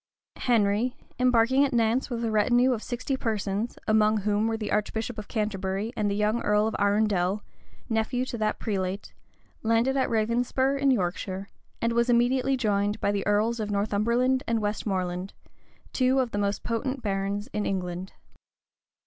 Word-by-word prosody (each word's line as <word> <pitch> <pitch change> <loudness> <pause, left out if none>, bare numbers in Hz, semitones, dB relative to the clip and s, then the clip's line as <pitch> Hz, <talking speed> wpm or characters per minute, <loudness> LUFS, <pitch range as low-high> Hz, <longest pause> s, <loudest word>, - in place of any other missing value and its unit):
Henry, 225 0 +1 0.2
embarking 250 +2 +4
at 280 -1 0
Nantz 235 +2 +1
with 235 -2 -2
a 225 - -1
retinue 240 +4 +3
of 225 - -3
sixty 250 +3 -3
persons, 215 -2 -2
among 215 0 +3
whom 210 +2 +1
were 225 0 -1
the 215 -2 -4
archbishop 220 +2 -1
of 210 - -8
Canterbury 205 0 -2
and 210 -1 0
the 200 - -1
young 210 +3 +1
earl 210 0 +2
of 220 - -1
Arundel, 205 -1 +1 0.4
nephew 235 +2 0
to 245 - -5
that 215 0 0
prelate, 195 -2 -3 0.5
landed 230 +4 +2
at 265 - +1
Ravenspur, 240 +4 +1
in 275 0 +3
Yorkshire; 190 -3 -1 0.3
and 230 0 +2
was 235 +1 +2
immediately 255 +3 +3
joined 205 -3 0
by 200 - +1
the 200 -1 -2
earls 215 +3 +2
of 210 -1 -2
Northumberland 230 +6 +1
and 230 -1 +1
Westmoreland, 190 -3 -2 0.6
two 260 0 +2
of 250 -3 0
the 205 - -2
most 200 0 -1
potent 255 +3 -2
barons 200 0 -1
in 210 -1 -1
England. 180 -1 -3
220 Hz, 160 wpm, -27 LUFS, 205-240 Hz, 0.6 s, embarking